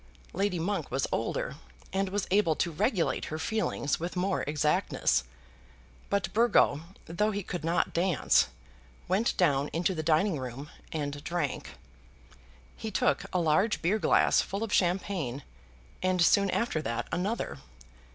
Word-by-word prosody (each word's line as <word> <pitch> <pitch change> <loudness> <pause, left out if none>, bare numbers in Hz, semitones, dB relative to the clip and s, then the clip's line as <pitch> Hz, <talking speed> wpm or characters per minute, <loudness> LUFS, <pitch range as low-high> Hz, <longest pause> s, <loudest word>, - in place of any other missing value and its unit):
Lady 195 0 0
Monk 195 +5 -2
was - - 0
older, - - -2 0.4
and 195 0 0
was 200 0 -1
able 185 -5 +3
to 170 - 0
regulate 190 - 0
her 155 - -4
feelings 160 -5 -1
with 175 +3 -4
more 185 +1 0
exactness. 145 - +1 0.8
But 200 -3 -1
Burgo, 225 -10 +4 0.2
though 210 +6 0
he 205 -1 -3
could 175 -2 -5
not 170 +2 +1
dance, 175 -1 +3 0.6
went 195 +6 +1
down 145 -5 +3
into 175 +3 +1
the 160 - -3
dining 160 +2 +2
room 130 +3 -7 0.2
and 145 -2 -4
drank. 170 -5 -3 1.0
He 220 - -5
took 145 -8 +1
a 180 - +1
large 175 +7 +2
beer 195 +6 +2
glass - - +4
full 200 +3 -4
of 225 - -3
champagne 175 -7 0 0.6
and 185 0 +1
soon 200 +3 +4
after 185 -7 0
that 115 -5 -3
another. 180 - -2
175 Hz, 140 wpm, -29 LUFS, 155-200 Hz, 1.0 s, Burgo